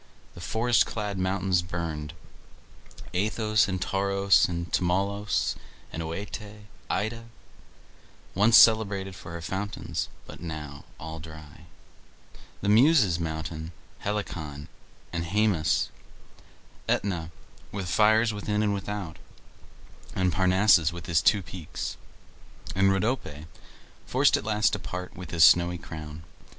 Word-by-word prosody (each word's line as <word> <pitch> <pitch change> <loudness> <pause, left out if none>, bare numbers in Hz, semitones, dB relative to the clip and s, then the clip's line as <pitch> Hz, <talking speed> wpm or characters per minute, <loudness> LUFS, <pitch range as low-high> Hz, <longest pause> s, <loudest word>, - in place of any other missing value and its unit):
The 85 - -11
forest 115 +4 +2
clad 105 -3 -4
mountains 95 -1 +1
burned, 85 -3 -5 1.0
Athos 105 +1 +2
and 95 -1 -2
Taurus 100 +1 +3
and 85 0 -4
Tmolus 100 +3 0 0.4
and 80 - -4
OEte; 105 +5 -6 0.3
Ida, 115 +2 -2 1.1
once 105 +4 +6
celebrated 100 -4 +4
for 85 0 -8
fountains, 95 +4 -4 0.2
but - - -11
now 75 -4 -7
all 80 +1 -7
dry; 80 -2 -12 1.0
the 100 - -2
Muses' 110 - +5
mountain 80 0 -4 0.3
Helicon, 80 -8 -4 0.4
and 85 -1 -1
Haemus; 95 -2 +1 1.0
Aetna, 90 -5 0 0.4
with 100 -2 -4
fires 110 +4 +4
within 105 +1 -1
and 105 -1 +1
without, 100 -4 -5 1.0
and 90 -2 +1
Parnassus, 95 -2 +4
with 85 0 -8
his 85 -3 +2
two 105 -3 +3
peaks, 85 -3 -6 0.8
and 95 +1 +4
Rhodope, 95 - -2 0.6
forced - - +4
at - - -2
last 105 0 +2
to - - -1
part 90 0 -6
with 90 -3 -8
his 80 -1 +3
snowy 85 +1 +6
crown. 80 -2 -9
95 Hz, 115 wpm, -27 LUFS, 85-105 Hz, 1.1 s, once